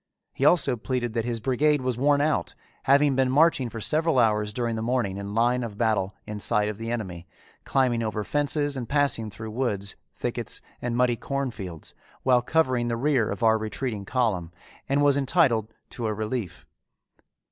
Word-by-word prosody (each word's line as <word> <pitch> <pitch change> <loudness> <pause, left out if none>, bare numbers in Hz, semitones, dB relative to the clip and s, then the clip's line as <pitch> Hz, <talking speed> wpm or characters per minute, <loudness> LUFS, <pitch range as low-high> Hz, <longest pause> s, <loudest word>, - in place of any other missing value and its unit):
He 135 - -1
also 140 -6 +4
pleaded 120 0 -2
that 115 -1 -1
his 120 -1 -2
brigade 140 +5 +2
was 130 -1 -1
worn 140 +3 +3
out, 150 - 0 0.3
having 140 0 +4
been 130 -1 +2
marching 140 -2 +3
for 115 - -7
several 155 +5 +1
hours 105 -3 +2
during 115 +1 -2
the 110 - -3
morning 115 -5 -1
in 100 +1 -6
line 120 +2 +2
of 110 -3 -6
battle 105 -4 0
in 105 -1 -6
sight 105 0 +2
of 105 0 -6
the 115 0 -4
enemy, 95 -7 -4 0.4
climbing 125 -3 +1
over 110 -1 -2
fences 145 +2 0
and 125 -4 -5
passing 140 -6 +1
through 110 +1 -8
woods, 105 -5 -2 0.2
thickets, - - -4 0.2
and 120 -1 -2
muddy 125 -1 +2
cornfields, 115 - -5 0.3
while 125 -2 +4
covering 130 -4 +1
the 115 -1 -1
rear 130 -4 +1
of 100 - -4
our 110 -1 +4
retreating 110 -1 -4
column, 95 -9 0 0.4
and 140 +1 +2
was 145 -1 +4
entitled 135 - +2 0.2
to 115 -2 -3
a 110 - -1
relief. 110 -3 -4
120 Hz, 180 wpm, -26 LUFS, 110-135 Hz, 0.4 s, also